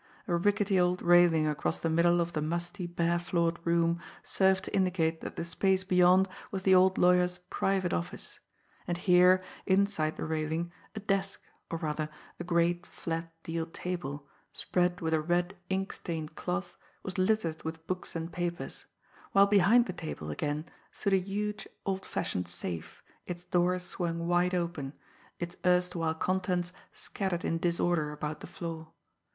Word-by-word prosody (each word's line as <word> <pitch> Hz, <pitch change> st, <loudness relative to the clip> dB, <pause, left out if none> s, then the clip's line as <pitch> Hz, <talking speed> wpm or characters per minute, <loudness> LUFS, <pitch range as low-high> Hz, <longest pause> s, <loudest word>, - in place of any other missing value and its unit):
A 175 Hz, -, +1 dB
rickety 200 Hz, +2 st, +2 dB
old 180 Hz, 0 st, +2 dB
railing 175 Hz, -2 st, +6 dB
across 150 Hz, +2 st, -1 dB
the -, -, -1 dB
middle 170 Hz, +2 st, +4 dB
of 170 Hz, 0 st, -2 dB
the 155 Hz, -, -1 dB
musty, 175 Hz, +4 st, -2 dB
bare 170 Hz, 0 st, +1 dB
floored 170 Hz, 0 st, 0 dB
room 170 Hz, 0 st, +2 dB, 0.2 s
served 190 Hz, 0 st, +2 dB
to -, -, -4 dB
indicate 175 Hz, -4 st, +1 dB
that -, -, -6 dB
the 170 Hz, -, -3 dB
space 190 Hz, +2 st, +1 dB
beyond 185 Hz, 0 st, +5 dB, 0.2 s
was 190 Hz, -1 st, -4 dB
the 190 Hz, -, +5 dB
old 185 Hz, 0 st, +5 dB
lawyer's 180 Hz, 0 st, +4 dB
"private" 190 Hz, -2 st, +1 dB
office. 85 Hz, 0 st, -4 dB, 0.5 s
And 175 Hz, -, -1 dB
here, 180 Hz, +1 st, +5 dB, 0.2 s
inside 190 Hz, -5 st, +2 dB
the -, -, -3 dB
railing, 160 Hz, +2 st, -2 dB, 0.2 s
a -, -, -3 dB
desk, 195 Hz, -1 st, -1 dB, 0.3 s
or, 165 Hz, -, -2 dB
rather, 155 Hz, -1 st, -2 dB, 0.3 s
a -, -, -3 dB
great, 175 Hz, 0 st, +1 dB
flat, 165 Hz, 0 st, -4 dB
deal 165 Hz, 0 st, -3 dB
table, 165 Hz, -5 st, -5 dB, 0.3 s
spread 180 Hz, 0 st, 0 dB
with 160 Hz, -1 st, 0 dB
a 155 Hz, -, +3 dB
red, 175 Hz, +4 st, 0 dB
ink 190 Hz, +1 st, -1 dB
stained 160 Hz, -2 st, -4 dB
cloth, 175 Hz, +2 st, -3 dB, 0.3 s
was 185 Hz, -1 st, -4 dB
littered 185 Hz, -5 st, +1 dB
with 160 Hz, 0 st, -6 dB
books 185 Hz, 0 st, -4 dB
and 165 Hz, +1 st, -4 dB
papers; 175 Hz, -1 st, -4 dB, 0.5 s
while 200 Hz, 0 st, +7 dB
behind 205 Hz, +4 st, +5 dB
the 185 Hz, -, -4 dB
table, 155 Hz, -, -5 dB
again, 150 Hz, -, -2 dB, 0.3 s
stood 200 Hz, -, -1 dB
a -, -, +6 dB
huge, 205 Hz, +3 st, -3 dB, 0.2 s
old 190 Hz, -1 st, -2 dB
fashioned 90 Hz, -1 st, -2 dB
safe, 85 Hz, -1 st, -6 dB, 0.2 s
its 175 Hz, -1 st, -5 dB
door 180 Hz, 0 st, +2 dB
swung 170 Hz, -2 st, -3 dB
wide 175 Hz, +1 st, +2 dB
open, 170 Hz, -6 st, -2 dB, 0.4 s
its 175 Hz, +1 st, -5 dB
erstwhile 180 Hz, -3 st, +2 dB
contents 180 Hz, 0 st, 0 dB, 0.2 s
scattered 190 Hz, -3 st, -3 dB
in 165 Hz, -, 0 dB
disorder 170 Hz, -3 st, +1 dB
about 150 Hz, 0 st, -4 dB
the -, -, -9 dB
floor. 165 Hz, -2 st, -7 dB
175 Hz, 160 wpm, -30 LUFS, 165-185 Hz, 0.5 s, while